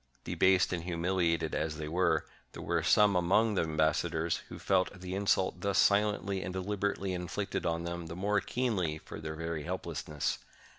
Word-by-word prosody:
Debased 95 -1 +3
and 85 -1 -3
humiliated 85 -2 0
as 75 0 -1
they 75 -1 -4
were, 80 -1 +1 0.3
there - - -8
were - - 0
some 105 -2 +4
among 100 +5 +3
the 95 - +2
ambassadors 80 +1 +1
who - - -8
felt 95 -1 +1
the 90 0 -6
insult 95 -2 +1
thus 100 0 0
silently 100 -2 +2
and 90 0 -5
dehberately 100 0 -1
inflicted 90 +2 -3
on 85 0 -1
them 85 -1 -4
the 80 - -7
more 100 +2 +1
keenly 100 -11 -1
for 80 - -9
their 80 0 -5
very 80 -1 -3
helplessness. 80 -3 -3
90 Hz, 165 wpm, -31 LUFS, 80-95 Hz, 0.3 s, some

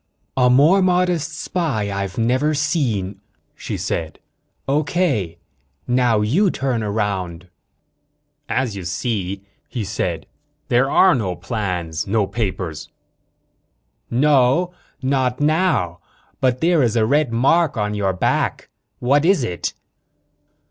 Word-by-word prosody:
"A 125 -1 +4
more 150 +10 +5
modest 180 -3 +1
spy 130 - -2
I've 100 -1 -4
never 130 +7 +1
seen. 140 - 0
Okay," 100 - -13 0.4
she - - -5
said, 80 -2 -3 1.7
"now 120 -3 +2
you 160 - +2
turn 130 -7 -1
around." 95 -5 -3 1.0
"As 130 -6 -1
you 95 - -6
see," 95 +1 -3 0.3
he 120 - -3
said, 95 -4 -3 0.4
"there 125 +3 +3
are 190 +4 +5
no 100 -8 -1
plans 90 -9 -3
no 105 +1 +2
papers." 95 -7 -4 1.2
"No 145 +6 +3 0.3
not 130 -2 0
now. 145 - +1 0.4
But 130 -1 +1
there 170 -1 +3
is 120 -3 +1
a 110 -2 +3
red 140 +1 +2
mark 135 +5 +2
on 105 -1 -1
your 100 -2 0
back. 90 - -1 0.3
What 140 +4 +2
is 180 -4 +3
it?" 90 -7 -3
120 Hz, 115 wpm, -20 LUFS, 100-145 Hz, 1.7 s, more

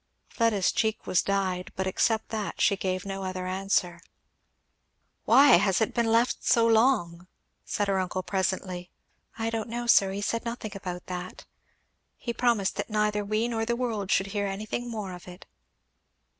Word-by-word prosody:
Fleda's 225 -5 +1
cheek 220 -1 -1
was 180 - +2
dyed, 190 -2 -1
but 190 - -2
except 220 +4 0
that 215 -2 -4
she 200 - +4
gave 185 -1 -3
no 195 0 -4
other 185 -1 -4
answer. 185 -2 0 1.3
"Why 280 -5 +7
has 195 0 +2
it 220 - 0
been 235 -1 +1
left 230 +2 +2
so 230 -1 +4
long?" 220 -7 +2 0.4
said 205 -1 -1
her 195 -1 +1
uncle 185 0 -2
presently. 185 -2 -2 0.5
"I 225 0 -2
don't 225 0 -3
know, 240 +1 -3
sir 195 -5 +5
he 200 +1 -4
said 230 +2 -1
nothing 235 -2 -5
about 180 -2 -6
that. 180 0 -7 0.7
He 235 - -4
promised 235 -6 +1
that - - -3
neither 210 -1 0
we 215 +3 0
nor 225 -2 -2
the 235 +1 0
world 225 -6 -2
should 195 - +2
hear 205 -1 -1
anything 215 +5 -4
more 210 -5 -5
of 180 0 -11
it." 180 +1 -11
200 Hz, 170 wpm, -27 LUFS, 185-225 Hz, 1.3 s, Why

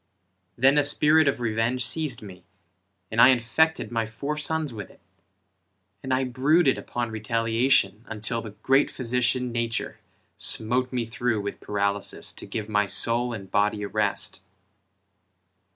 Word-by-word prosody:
Then 135 +4 +4
a - - +3
spirit 150 +2 +4
of 140 - 0
revenge 115 +2 0
seized 130 -3 -1
me, 95 -3 -12 0.7
And 115 +1 +2
I - - +9
infected 125 +1 +1
my 115 -2 -1
four 140 +7 -5
sons 150 -2 -2
with 105 -3 -8
it, - - -20 1.0
And 130 - -6
I 130 +1 +1
brooded 135 +4 +2
upon 120 -2 -4
retaliation, 115 -1 +1
Until 115 +1 -2
the 110 - -8
great 135 +2 +3
physician, 125 0 -1
Nature, 115 -1 -3 0.4
Smote 125 +3 +1
me 125 -2 -2
through 120 -2 -2
with 100 - -6
paralysis 100 -1 0
To - - -10
give 110 -2 -5
my 105 -1 +1
soul 120 +4 +2
and 100 -5 -8
body 105 0 0
a - - -3
rest. 105 -1 -1
120 Hz, 145 wpm, -25 LUFS, 110-130 Hz, 1.0 s, I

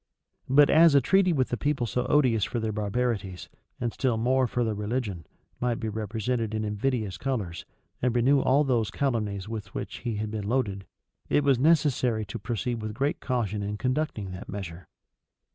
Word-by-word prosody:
But 145 +2 +6
as 160 -2 +6
a - - +8
treaty 190 +7 +3
with 130 -6 0
a - - +1
people 145 -3 0
so 125 +2 -1
odious 125 -8 +3
for 120 - -1
their 110 -1 -1
barbarities, 105 -3 -2 0.3
and 120 -2 -2
still 125 -5 0
more 130 +3 +2
for 120 +1 -1
their 110 -2 0
religion, 105 -4 -3 0.3
might 120 -1 0
be 110 - -2
represented 110 +1 -2
in 110 0 -1
invidious 105 -3 -2
colors, 110 -11 -3 0.4
and 125 -1 +1
renew 135 +4 +4
all 135 +2 +3
those 120 -6 +1
calumnies 105 -8 -1
with 110 -1 -6
which - - -5
he 115 -2 -3
had 105 0 -3
been 105 -2 -4
loaded, 100 -6 -1 0.4
it 145 - +3
was 135 -3 +3
necessary 135 -7 +2
to 100 - -6
proceed 120 0 -3
with 110 0 -5
great 140 +4 0
caution 110 -6 -1
in 105 +1 -3
conducting 125 -6 -2
that 90 +1 -8
measure. 90 -4 -7
115 Hz, 180 wpm, -27 LUFS, 105-130 Hz, 0.4 s, a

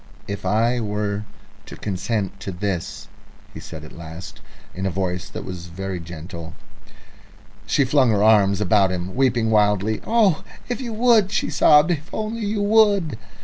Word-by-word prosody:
"If 100 -2 -4
I 115 +5 +2
were 105 -1 -2 0.4
to - - -9
consent 100 0 -3
to 100 - -5
this?" 90 -1 -4 0.5
he - - -8
said 80 -2 -9
at 75 - -11
last, 85 +2 -10 0.3
in 95 +1 -3
a - - +1
voice 90 -1 -3
that - - -7
was 90 -2 -7
very 95 +1 -5
gentle. 85 0 -9 1.1
She 140 - +2
flung 130 -1 +3
her 105 -2 +2
arms 100 -3 +4
about 100 -1 +3
him, 90 0 -4
weeping 120 -4 +1
wildly. 105 0 +2
"Oh, 220 -8 +3 0.2
if 245 +1 -3
you 240 -3 -4
would," 220 -3 +3
she - - -1
sobbed, 150 +3 +5
"if 160 +1 -3
only 220 0 -3
you 205 0 -1
would!" 205 - +3
105 Hz, 160 wpm, -22 LUFS, 95-150 Hz, 1.1 s, sobbed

